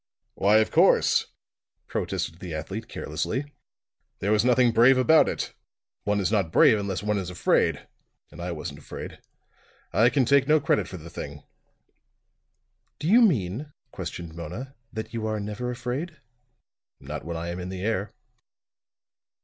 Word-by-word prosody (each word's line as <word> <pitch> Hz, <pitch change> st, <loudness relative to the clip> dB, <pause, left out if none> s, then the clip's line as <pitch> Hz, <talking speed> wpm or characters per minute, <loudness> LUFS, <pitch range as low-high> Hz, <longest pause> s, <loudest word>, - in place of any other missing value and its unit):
"Why, 105 Hz, +2 st, +4 dB
of 110 Hz, -, +2 dB
course," -, -, +4 dB, 0.6 s
protested 85 Hz, 0 st, -3 dB
the 90 Hz, -3 st, -6 dB
athlete 95 Hz, +9 st, -5 dB
carelessly. 145 Hz, +2 st, -3 dB, 0.6 s
"There 100 Hz, -, -1 dB
was 105 Hz, 0 st, +4 dB
nothing 125 Hz, -1 st, +4 dB
brave 120 Hz, +4 st, +6 dB
about 155 Hz, +5 st, +5 dB
it. -, -, -4 dB, 0.5 s
One 105 Hz, 0 st, +1 dB
is 100 Hz, 0 st, 0 dB
not 100 Hz, -7 st, +1 dB
brave 110 Hz, +5 st, +6 dB
unless 100 Hz, -1 st, -3 dB
one 105 Hz, -1 st, 0 dB
is 90 Hz, -2 st, -4 dB
afraid; 90 Hz, -, +1 dB, 0.4 s
and 80 Hz, +3 st, -10 dB
I 90 Hz, +1 st, -3 dB
wasn't 75 Hz, -3 st, -6 dB
afraid. -, -, -8 dB, 0.7 s
I 115 Hz, +3 st, +5 dB
can 135 Hz, -1 st, +2 dB
take 140 Hz, +2 st, +4 dB
no 155 Hz, +1 st, +5 dB
credit 105 Hz, -, +1 dB
for 95 Hz, -, -7 dB
the 85 Hz, 0 st, -11 dB
thing." 75 Hz, 0 st, -7 dB, 1.5 s
"Do 155 Hz, -, -4 dB
you 230 Hz, +7 st, +6 dB
mean," 140 Hz, -, +1 dB, 0.2 s
questioned 85 Hz, -2 st, -6 dB
Mona, 90 Hz, -, -7 dB, 0.2 s
"that 110 Hz, 0 st, -6 dB
you 110 Hz, -1 st, -2 dB
are 110 Hz, -1 st, -1 dB
never 105 Hz, +4 st, -4 dB
afraid?" 130 Hz, +6 st, -4 dB, 0.8 s
"Not -, -, -6 dB
when 85 Hz, +2 st, -4 dB
I 85 Hz, +1 st, -4 dB
am 85 Hz, +1 st, -4 dB
in 90 Hz, 0 st, -5 dB
the 95 Hz, 0 st, -5 dB
air." 105 Hz, -2 st, -1 dB
105 Hz, 155 wpm, -26 LUFS, 90-125 Hz, 1.5 s, brave